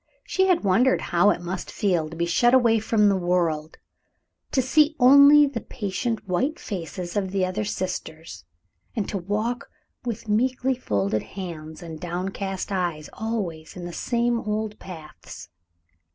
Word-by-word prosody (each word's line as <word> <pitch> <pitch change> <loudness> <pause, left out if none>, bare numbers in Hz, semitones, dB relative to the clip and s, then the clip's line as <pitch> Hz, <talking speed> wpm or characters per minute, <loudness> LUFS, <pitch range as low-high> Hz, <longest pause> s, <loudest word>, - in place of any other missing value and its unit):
She 380 0 +1
had 360 -2 +2
wondered 220 +7 +3
how 175 +4 +5
it 175 - 0
must 175 +1 -5
feel 175 -6 0
to 165 - -9
be 170 +1 0
shut 240 +9 +4
away 230 -3 +4
from 215 -1 +2
the 200 - +3
world; 170 -4 0 0.7
to - - +1
see 300 +4 +3
only 280 +3 +8
the 270 -5 -4
patient 215 +1 -3
white 260 - 0
faces 180 -1 -6
of 195 -2 0
the 190 -1 0
other 185 +4 -2
sisters, 160 - -5 0.5
and 215 -4 -1
to 200 - -3
walk 215 +8 -2 0.3
with 230 -2 -5
meekly 255 +4 +1
folded 105 - -1
hands 165 -4 -8
and 160 -2 -8
downcast 190 +3 -4
eyes 175 -5 -2
always 195 -8 -4
in 175 - -6
the 175 - -6
same 235 +3 0
old 215 0 -3
paths. 160 - -11
195 Hz, 150 wpm, -24 LUFS, 175-235 Hz, 0.7 s, only